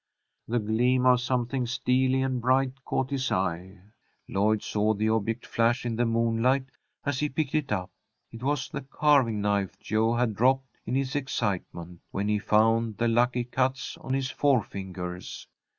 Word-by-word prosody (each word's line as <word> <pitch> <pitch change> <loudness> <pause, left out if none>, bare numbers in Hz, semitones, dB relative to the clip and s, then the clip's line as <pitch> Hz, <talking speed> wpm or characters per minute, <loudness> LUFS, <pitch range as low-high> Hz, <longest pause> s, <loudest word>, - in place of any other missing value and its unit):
The 120 - 0
gleam 120 +4 +2
of 125 -1 +5
something 125 0 -1
steely 130 +1 +1
and 130 -2 -1
bright 130 +1 +1
caught 130 +1 -1
his 135 -2 -1
eye. 95 +1 -2 0.5
Lloyd 105 +2 +1
saw 105 +1 +1
the 110 +2 0
object 110 +1 -1
flash 120 +2 +1
in 115 -1 -1
the 120 +1 +1
moonlight 115 +3 +2 0.4
as 145 -3 -1
he 150 - 0
picked 145 +1 -2
it 150 -5 0
up. 95 -3 -2 0.4
It 115 - -10
was 140 +1 -1
the - - -5
carving 135 -6 +2
knife 100 -2 0
Jo 110 +2 +1
had 120 -2 +1
dropped 130 +2 +1
in 125 - -1
his 135 +1 -1
excitement, 95 -10 -3
when 100 +1 -2
he 105 0 +2
found 110 +1 +2
the 120 +1 +1
"lucky 120 +1 +2
cuts" 130 +2 -1
on 130 0 -3
his 135 -1 -1
forefingers. 95 -10 -2
120 Hz, 165 wpm, -27 LUFS, 105-130 Hz, 0.5 s, of